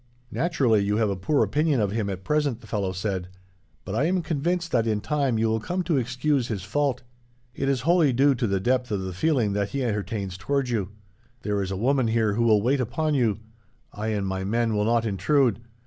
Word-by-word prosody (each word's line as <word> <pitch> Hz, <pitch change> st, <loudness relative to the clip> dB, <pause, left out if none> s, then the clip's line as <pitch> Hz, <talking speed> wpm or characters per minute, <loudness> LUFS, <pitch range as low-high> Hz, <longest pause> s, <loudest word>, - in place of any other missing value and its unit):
"'Naturally, 130 Hz, -, +2 dB
you 105 Hz, +1 st, 0 dB
have 110 Hz, -3 st, +1 dB
a -, -, -1 dB
poor 115 Hz, +11 st, +1 dB
opinion 150 Hz, -2 st, +1 dB
of 105 Hz, -3 st, +1 dB
him 105 Hz, -2 st, -1 dB
at 95 Hz, -1 st, -5 dB
present,' 145 Hz, -4 st, 0 dB
the -, -, -14 dB
fellow 100 Hz, -4 st, -2 dB
said; 95 Hz, -1 st, -3 dB, 0.6 s
'but 95 Hz, -, -5 dB
I 135 Hz, +7 st, +1 dB
am 180 Hz, +1 st, +1 dB
convinced 170 Hz, +3 st, -1 dB
that, 115 Hz, -2 st, +2 dB
in 105 Hz, -2 st, +1 dB
time, 140 Hz, -1 st, 0 dB
you 110 Hz, +1 st, +2 dB
will 110 Hz, 0 st, +1 dB
come 180 Hz, +10 st, -2 dB
to 165 Hz, -5 st, +1 dB
excuse 130 Hz, +1 st, 0 dB
his 100 Hz, -5 st, -4 dB
fault. 130 Hz, +5 st, -1 dB, 0.5 s
It 135 Hz, +2 st, -2 dB
is 135 Hz, -3 st, +1 dB
wholly 165 Hz, 0 st, +3 dB
due 135 Hz, +3 st, +4 dB
to 120 Hz, -2 st, -1 dB
the 100 Hz, -1 st, 0 dB
depth 125 Hz, +4 st, 0 dB
of 100 Hz, -3 st, -2 dB
the 95 Hz, -1 st, -5 dB
feeling 120 Hz, -, +1 dB
that 100 Hz, 0 st, -1 dB
he 135 Hz, +5 st, -2 dB
entertains 105 Hz, -4 st, -3 dB
towards 135 Hz, +4 st, -1 dB
you. 100 Hz, -5 st, -1 dB, 0.5 s
There 105 Hz, -1 st, -1 dB
is 95 Hz, -, -3 dB
a 95 Hz, -, -3 dB
woman 130 Hz, +3 st, +2 dB
here 110 Hz, -2 st, +1 dB
who 115 Hz, -, 0 dB
will 105 Hz, -3 st, +4 dB
wait 130 Hz, +3 st, +2 dB
upon 150 Hz, +6 st, -1 dB
you. 115 Hz, -6 st, +1 dB, 0.5 s
I 105 Hz, +2 st, -4 dB
and 105 Hz, -3 st, -1 dB
my 95 Hz, 0 st, -2 dB
men 115 Hz, +2 st, 0 dB
will 105 Hz, 0 st, +1 dB
not 115 Hz, 0 st, +2 dB
intrude. 110 Hz, -, +2 dB
115 Hz, 225 wpm, -25 LUFS, 100-140 Hz, 0.6 s, due